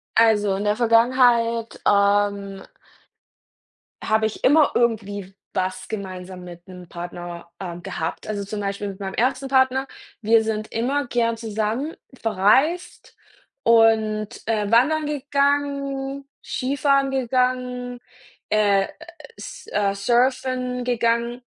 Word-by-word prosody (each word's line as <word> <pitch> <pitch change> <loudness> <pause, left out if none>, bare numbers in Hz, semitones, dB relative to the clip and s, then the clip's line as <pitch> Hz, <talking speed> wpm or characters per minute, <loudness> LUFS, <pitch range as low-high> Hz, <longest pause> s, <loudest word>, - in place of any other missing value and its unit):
Also, 210 -3 +4
in 200 - -3
der 210 0 +1
Vergangenheit, 235 0 +3
ähm 200 -1 +2 1.4
habe 220 0 +2
ich 215 - -9
immer 295 +1 +5
irgendwie 205 -5 -1 0.2
was 185 0 -2
gemeinsam 185 -3 -7
mit 175 0 -12
'nem 180 -1 -11
Partner, 175 0 -8
äh, 175 -3 -6
gehabt. 175 -3 -5
Also, 205 -2 -3
zum 205 +1 -5
Beispiel 200 0 -3
mit 195 0 -9
meinem 190 -1 -5
ersten 255 +2 0
Partner, 260 0 +2 0.3
wir 225 0 +4
sind 215 -1 -3
immer 265 +4 -1
gern 230 -1 0
zusammen 225 +6 -3 0.3
verreist 260 - +1 0.5
und, 220 -2 +3 0.2
äh, 215 -2 0
wandern 295 +6 +3
gegangen, 280 -1 -1 0.2
Skifahren 275 +1 +1
gegangen, 250 -1 -1 0.5
äh 200 -2 +3 0.5
S - - -10
äh, 200 -1 +1
Surfen 250 +3 0
gegangen. 235 0 0
225 Hz, 110 wpm, -22 LUFS, 200-255 Hz, 1.4 s, immer